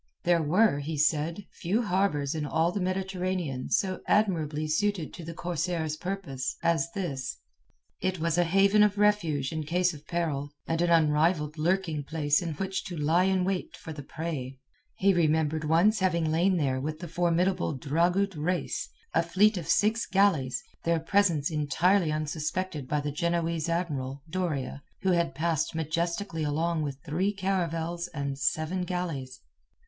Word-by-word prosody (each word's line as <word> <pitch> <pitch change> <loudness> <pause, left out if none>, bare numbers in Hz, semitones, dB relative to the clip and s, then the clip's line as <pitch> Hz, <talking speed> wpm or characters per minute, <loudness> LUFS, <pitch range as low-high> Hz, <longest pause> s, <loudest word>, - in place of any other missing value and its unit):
There 170 -1 +3
were, 165 +1 +3
he 150 +2 -4
said, 160 +5 +1
few 205 +8 -1
harbours 180 -8 +1
in 155 -2 -2
all 160 +4 +1
the 200 - -3
Mediterranean 185 -6 -2
so 190 -1 +1
admirably 160 -7 +1
suited 175 +1 0
to 175 - -8
the 165 +1 -7
corsairs' 170 -2 -2
purpose 160 -7 -4
as 165 0 +1
this; 140 -10 -3 0.6
it 185 -1 -1
was 165 0 +1
a 175 - +4
haven 195 +4 +4
of 210 -1 +4
refuge 170 -10 +2
in 160 -1 -2
case 175 +3 +1
of 150 0 -13
peril, 155 -5 -1 0.2
and 165 0 -1
an 175 - +2
unrivalled 155 -1 +3
lurking 165 -2 0
place 145 0 +1
in 165 -3 -3
which 190 +4 -2
to 175 - -6
lie 160 +5 +3
in 190 -1 +2
wait 190 -1 -2
for 160 - -8
the 145 - -7
prey. 140 -3 -5 0.4
He 195 +1 +3
remembered 160 -2 +1
once 175 +8 +4
having 170 -4 +1
lain 180 +4 +3
there 130 -4 0
with 155 +2 -3
the 175 +2 -7
formidable 175 +1 +1
Dragut 175 +8 +1
Reis, 170 +4 -2 0.2
a 165 - +4
fleet 195 +6 +3
of 175 -5 -4
six 215 +1 +2
galleys, 185 -10 +2 0.2
their 170 0 +2
presence 165 -3 +2
entirely 155 +4 +2
unsuspected 155 0 -3
by 150 +1 0
the 145 0 -3
Genoese 170 +1 -1
admiral, 140 -6 -2
Doria, 155 -6 -2 0.2
who 190 - +3
had 170 -6 +1
passed 160 +1 0
majestically 170 +3 -2
along 160 +2 0
with 140 -3 -3
three 180 +7 0
caravels 175 -3 -2
and 140 -1 -3
seven 155 +6 0
galleys. 165 -8 -4
165 Hz, 160 wpm, -28 LUFS, 150-185 Hz, 0.6 s, a